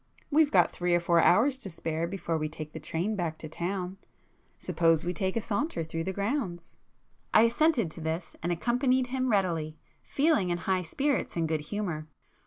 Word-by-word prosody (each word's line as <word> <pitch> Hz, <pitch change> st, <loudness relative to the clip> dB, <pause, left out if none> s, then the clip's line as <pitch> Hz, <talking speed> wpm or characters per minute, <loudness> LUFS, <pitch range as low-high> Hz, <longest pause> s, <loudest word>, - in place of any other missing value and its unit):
We've 305 Hz, 0 st, +5 dB
got 180 Hz, -, +4 dB
three 175 Hz, 0 st, +1 dB
or -, -, +4 dB
four 170 Hz, 0 st, +3 dB
hours 255 Hz, -, +4 dB
to 200 Hz, -, -7 dB
spare 165 Hz, -1 st, -2 dB
before 175 Hz, -2 st, -3 dB
we 155 Hz, -1 st, -1 dB
take 155 Hz, -1 st, -8 dB
the -, -, -6 dB
train 185 Hz, +7 st, -2 dB
back 170 Hz, -4 st, -2 dB
to 155 Hz, -, -8 dB
town,—suppose 175 Hz, -2 st, -2 dB
we 180 Hz, -, -1 dB
take 190 Hz, +4 st, -1 dB
a -, -, 0 dB
saunter 215 Hz, -, -1 dB
through 165 Hz, +1 st, -4 dB
the 190 Hz, -, -1 dB
grounds?" 200 Hz, -, -3 dB, 0.6 s
I 220 Hz, -, +8 dB
assented 235 Hz, -, +2 dB
to 165 Hz, -, -8 dB
this, 160 Hz, +2 st, -3 dB
and 175 Hz, -, -1 dB
accompanied 250 Hz, +8 st, +2 dB
him 260 Hz, -1 st, 0 dB
readily, 165 Hz, -7 st, 0 dB, 0.2 s
feeling 275 Hz, -, +2 dB
in 175 Hz, -, 0 dB
high 185 Hz, +2 st, 0 dB
spirits 270 Hz, -, -1 dB
and 165 Hz, -1 st, 0 dB
good 160 Hz, -1 st, -1 dB
humour. 160 Hz, -3 st, -4 dB
180 Hz, 185 wpm, -29 LUFS, 165-230 Hz, 0.6 s, I